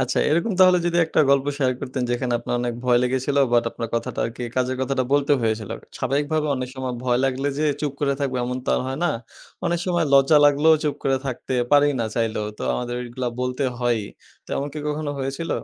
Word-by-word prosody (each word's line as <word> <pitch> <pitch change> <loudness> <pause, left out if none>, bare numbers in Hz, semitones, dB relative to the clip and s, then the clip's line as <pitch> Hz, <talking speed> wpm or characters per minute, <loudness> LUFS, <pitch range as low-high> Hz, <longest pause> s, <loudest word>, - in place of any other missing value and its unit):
আচ্ছা, 130 -1 0
এরকম 170 +8 +1
তাহলে 185 -1 +7
যদি 175 0 0
একটা 160 - +2
গল্প 140 0 +3
শেয়ার 130 -3 +2
করতেন, 130 0 -3
যেখানে 120 0 -1
আপনার 120 - -4
অনেক 120 -1 -2
ভয় 125 -1 +4
লেগেছিলো, 130 +3 +1
বাট 120 -1 +4
আপনার 115 - -5
কথাটা 115 - -2
আরকি 115 +2 -7
কাজের 130 0 0
কথাটা 130 0 0
বলতে 145 0 +3
হয়েছিলো। 110 -2 -1 0.3
স্বাভাবিকভাবে 145 +4 0
অনেক 130 0 -4
সময় 130 -2 -4
ভয় 125 -1 +2
লাগলে 135 +1 0
যে 155 - +1 0.2
চুপ 150 -3 -1
করে 140 -1 +1
থাকবো, 135 -2 -1
এমন 125 +1 -3
তো - - -7
আর - - 0
হয় 135 +1 -4
না। - - +3 0.6
অনেক 175 0 0
সময় 175 -2 +1
লজ্জা 140 +2 +6
লাগলেও, 145 +3 +5
চুপ 150 - 0
করে 135 -1 +2
থাকতে 130 0 -4 0.2
পারি 145 0 +6
না, 115 - 0
চাইলেও। 110 -2 -1
তো - - -6
আমাদের 120 0 -3
এগুলা 125 +1 -3
বলতে 125 +2 -2 0.2
হয়ই 120 -4 +1 0.4
তেমন 140 - -2
কি 155 - -5
কখনো 150 0 -2
হয়েছিল? 135 +5 -3
130 Hz, 205 wpm, -23 LUFS, 125-145 Hz, 0.6 s, তাহলে